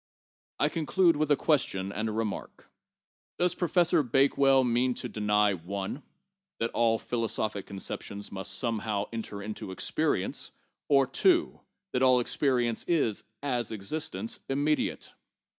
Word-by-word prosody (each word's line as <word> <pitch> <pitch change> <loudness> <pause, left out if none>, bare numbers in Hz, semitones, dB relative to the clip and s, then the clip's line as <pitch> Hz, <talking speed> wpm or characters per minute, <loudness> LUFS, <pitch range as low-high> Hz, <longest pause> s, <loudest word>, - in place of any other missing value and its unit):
1 - - +2
conclude 170 +2 +3
with 150 0 0
a 145 - +6
question 100 - +1
and 110 +2 -2
a - - -2
remark: 110 -1 -4 0.7
Does 180 0 +2
Professor 175 -1 +3
Bake 135 +1 +2
well 135 -1 +5
mean 125 +1 +1
to - - -4
deny 105 -1 +2
(1) 95 - -5 0.6
that 115 - -1
all 115 -1 +2
philosophic 110 -4 -2
conceptions 100 +1 -6
must 95 0 -3
somehow 110 -4 -1
enter 105 -3 -5
into 105 -1 -6
experience, 95 - -1 0.4
or 140 -1 +5
(2) 345 - +2 0.3
that 125 - 0
all 130 -1 +5
experience 120 -2 0
is, 145 -11 +1 0.2
as 125 -5 -1
existence, 155 - -4
im 135 +1 0
mediate? 150 0 -1
120 Hz, 135 wpm, -29 LUFS, 105-145 Hz, 0.7 s, a